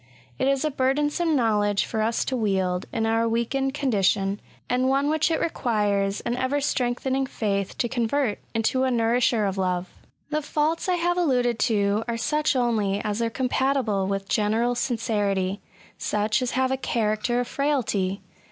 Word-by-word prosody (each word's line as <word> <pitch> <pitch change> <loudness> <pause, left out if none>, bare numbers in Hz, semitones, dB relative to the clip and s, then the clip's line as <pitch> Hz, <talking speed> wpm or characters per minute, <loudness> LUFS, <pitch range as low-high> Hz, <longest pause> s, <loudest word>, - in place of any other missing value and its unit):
It - - +1
is 275 +2 +1
a 305 - 0
burdensome 295 +5 +1
knowledge 210 -5 +2
for 220 - -2
us 225 +1 0
to 260 - -1
wield^ 190 -5 0
in 225 -1 -1
our 225 +1 +1
weakened 265 +4 -1
condition^ 200 -7 +1 0.3
and 255 +1 +1
one 280 +2 +2
which 315 0 +2
it 325 - +1
requires 205 -9 0
an 235 - -2
eyer«8trengthening 265 0 0
faith 200 -5 -2
to 240 - 0
convert 235 0 0 0.2
into 225 +4 +1
a 260 - +2
nourisher 235 -1 +2
of 195 -1 -2
lore. 180 -1 0 0.5
The 305 +1 0
faults 305 +4 -1
I 365 - +3
have 350 +1 0
alluded 245 -8 +1
to 205 0 +1
are 235 -1 -2
such 300 +6 +1
only 220 -5 +1
as 210 +1 -2
are 230 - +1
compatible 255 -5 0
with 195 0 -2
general 225 +4 +1
sincerity 205 -6 -1 0.2
— - - -26
such 210 +2 0
as 250 - 0
have 260 0 +2
a 265 - +1
character 230 -1 0
of 245 - -1
frailty. 220 -9 -1
235 Hz, 165 wpm, -25 LUFS, 210-270 Hz, 0.5 s, I